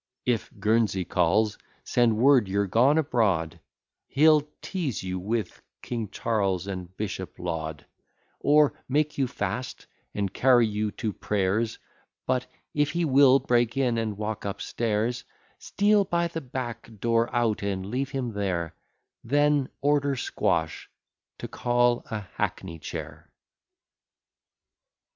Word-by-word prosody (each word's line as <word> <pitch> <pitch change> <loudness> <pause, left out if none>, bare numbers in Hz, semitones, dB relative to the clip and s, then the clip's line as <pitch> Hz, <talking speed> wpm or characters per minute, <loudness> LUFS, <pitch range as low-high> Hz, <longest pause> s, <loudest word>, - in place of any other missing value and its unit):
If 120 -3 0
Guernsey 105 -3 +1
calls, 100 +6 +1 0.2
send 120 -3 +2
word 130 -2 +5
you're 100 +2 +1
gone 125 - +4
abroad; 105 - +1 0.5
He'll 155 +1 +5 0.2
teaze 165 - -3
you 95 0 -3
with 105 +1 -3 0.2
King 115 -4 -4
Charles, 100 -5 -1
and 95 -2 -7
Bishop 95 -5 -5
Laud, 80 -3 -4 0.5
Or 150 0 +4 0.2
make 150 +2 0
you 135 - +2
fast, 110 +2 -4 0.3
and 100 -2 -2
carry 125 -2 +5
you 105 0 -1
to 110 -3 -3
prayers; 105 +3 -1 0.5
But, 130 0 0 0.3
if 145 -1 +2
he 170 +2 0
will 135 -2 +6
break 120 -1 +1
in, 125 -4 +1
and 110 -3 -3
walk 110 0 -4
up 100 0 -4
stairs, 115 +1 -1 0.4
Steal 205 0 +2
by 170 -1 0
the 165 -1 -5
back 120 -3 -6
door 115 +1 +2
out, 120 -3 +1
and 95 -2 -2
leave 130 +6 -2
him 130 -5 -3
there; 90 -5 -2 0.5
Then 145 +1 +2
order 145 0 +2
Squash 125 - -1 0.5
to - - -6
call 120 0 +1
a 110 -1 -3
hackney 90 -2 -4
chair. - - -8
115 Hz, 130 wpm, -26 LUFS, 100-135 Hz, 0.5 s, will